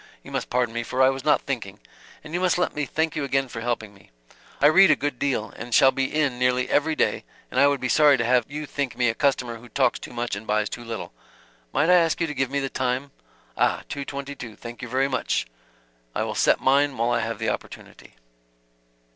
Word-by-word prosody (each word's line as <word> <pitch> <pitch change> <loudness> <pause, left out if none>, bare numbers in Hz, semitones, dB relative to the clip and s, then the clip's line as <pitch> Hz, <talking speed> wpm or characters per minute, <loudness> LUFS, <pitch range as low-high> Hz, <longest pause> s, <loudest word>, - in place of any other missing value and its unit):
You - - -12
must - - -3
pardon 125 -2 0
me, 120 - -2
for 130 +2 0
I 130 - +6
was 135 -1 -6
not 150 - +3
thinking. 110 -7 -5 0.4
And 155 +1 -10
you 175 - 0
must 185 -1 +2
let 180 - 0
me 150 -1 -2
thank 160 +3 -1
you 150 - -2
again 135 0 0
for 115 -2 -7
helping 115 -3 -3
me. 100 - -21 0.5
I - - +3
read 190 +6 +7
a - - +6
good 145 -3 -3
deal, 130 -6 -1
and 120 0 -3
shall 135 - +7
be 135 0 -1
in 140 -5 0
nearly 125 0 +2
every 155 +2 +2
day - - 0 0.3
and - - 0
I 140 - +7
would 140 -1 +1
be 125 - -2
sorry 145 +1 +5
to 115 - -1
have 125 +2 +2
you 150 +1 -5
think 140 -3 -3
me 120 -2 +3
a - - 0
customer 125 -3 0
who 120 +2 -15
talks 130 -2 +1
too - - -9
much 120 -3 -3
and 105 +2 -8
buys 105 0 +1
too 120 - -7
little. 115 - -6 0.6
Might 165 - +2
I 180 - +7
ask 165 -2 +2
you 165 - +1
to 150 - -4
give 135 -3 -1
me 140 +1 -1
the 135 - -2
time? 130 +1 -2 0.4
Ah - - +1
two 140 - -4
twenty 140 0 -6
two. 115 -6 -9
Thank 120 +1 -10
you 120 - -5
very 130 +3 +1
much. 130 -2 -1 0.7
I - - 0
will - - -3
set - - +3
mine 140 0 +2
while 115 +1 +1
I 120 - +2
have 115 0 -3
the - - -1
opportunity." - - -8
130 Hz, 245 wpm, -24 LUFS, 120-145 Hz, 0.7 s, read